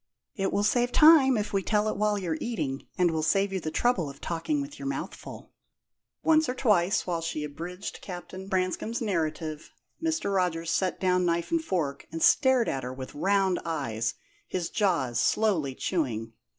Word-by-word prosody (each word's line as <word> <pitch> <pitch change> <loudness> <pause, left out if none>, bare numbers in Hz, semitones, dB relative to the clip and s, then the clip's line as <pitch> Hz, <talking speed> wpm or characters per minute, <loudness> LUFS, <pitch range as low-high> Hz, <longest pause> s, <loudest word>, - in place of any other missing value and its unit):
"It 195 -1 -1
will 205 - +1
save 245 +3 +2
time 300 -5 +7
if 210 0 -3
we 195 - +2
tell 210 +2 +1
it 215 - -1
while 210 0 +1
you're 170 -5 -2
eating, 140 - -3
and 180 -2 +3
will 160 -1 -1
save 195 +5 +1
you 190 - 0
the 160 - -4
trouble 185 -3 +1
of 140 - -11
talking 175 - -2
with 285 +1 -6
your 275 - -5
mouth 280 - -3
full." - - -11 0.7
Once 315 -2 +4
or 250 - -2
twice, 205 -7 +2
while 170 -2 -2
she 160 -2 -3
abridged 170 +6 -6
Captain 185 +1 -8
Branscome's 190 +4 -1
narrative, 160 -6 -2 0.3
Mr. 320 -10 0
Rogers 170 -3 0
set 185 0 0
down 180 -1 +2
knife 170 -1 0
and 330 -1 +1
fork, 155 - -2
and 165 - -4
stared 260 -3 +4
at 135 - -1
her 125 0 -5
with 130 0 -8
round 190 +2 +2
eyes, 115 -8 -2 0.3
his 180 -2 -3
jaws 165 - +1
slowly 170 -12 +1
chewing. 115 - -2
185 Hz, 180 wpm, -28 LUFS, 160-215 Hz, 0.7 s, time